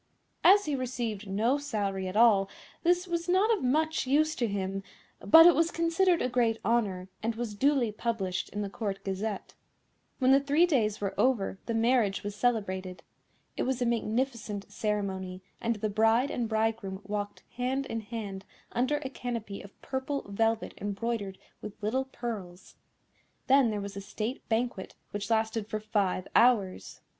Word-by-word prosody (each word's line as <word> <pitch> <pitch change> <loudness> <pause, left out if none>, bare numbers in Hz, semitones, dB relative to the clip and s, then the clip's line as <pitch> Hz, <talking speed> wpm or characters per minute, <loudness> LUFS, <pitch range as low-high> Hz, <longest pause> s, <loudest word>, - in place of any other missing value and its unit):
As 405 +2 +7
he 300 - -1
received 240 -5 -3
no 225 +8 +1
salary 200 -9 -2
at 185 - -5
all 210 -4 +5 0.3
this 355 +1 +2
was 340 -1 -3
not 405 +5 +4
of 395 - -6
much 310 +3 +1
use 310 +3 +3
to 240 - 0
him, 195 -1 -2 0.4
but 325 +1 +8
it 350 - +9
was 330 +1 +2
considered 335 +2 +2
a - - +2
great 240 -3 +1
honour, 200 -5 0
and 225 +1 -1
was 230 -2 -4
duly 260 0 +2
published 210 -4 -2
in 205 +1 -3
the 200 - -4
Court 200 -2 -4
Gazette. 195 +1 -4 0.6
When 260 -1 +3
the 270 - +7
three 290 +5 +3
days 225 - +1
were 200 -1 -1
over 210 -7 +1
the 230 - -1
marriage 225 -3 +2
was 205 0 -4
celebrated. 190 -6 -1 0.5
It - - -2
was 260 -1 0
a 245 - +1
magnificent 230 -3 -2
ceremony, 190 -3 -3 0.2
and 230 0 0
the 215 +1 -2
bride 225 +5 +3
and 235 -2 -2
bridegroom 220 -3 -1
walked 205 0 -4
hand 260 +2 -1
in 225 - -3
hand 205 -3 -6 0.3
under 260 +5 +1
a - - -2
canopy 230 -6 -5
of 200 - -15
purple 265 +1 -3
velvet 225 +2 0
embroidered 205 -1 -3 0.2
with 210 - -7
little 260 +6 0
pearls. 215 -9 -7 0.7
Then 270 -2 +5
there 210 -1 -2
was 200 0 -6
a 200 - -5
State 215 +5 -5
Banquet, 225 -4 -1 0.2
which 205 +1 -4
lasted 220 -1 0
for 215 -1 -3
five 205 -4 -1
hours. 220 -7 +2
225 Hz, 165 wpm, -29 LUFS, 200-260 Hz, 0.7 s, it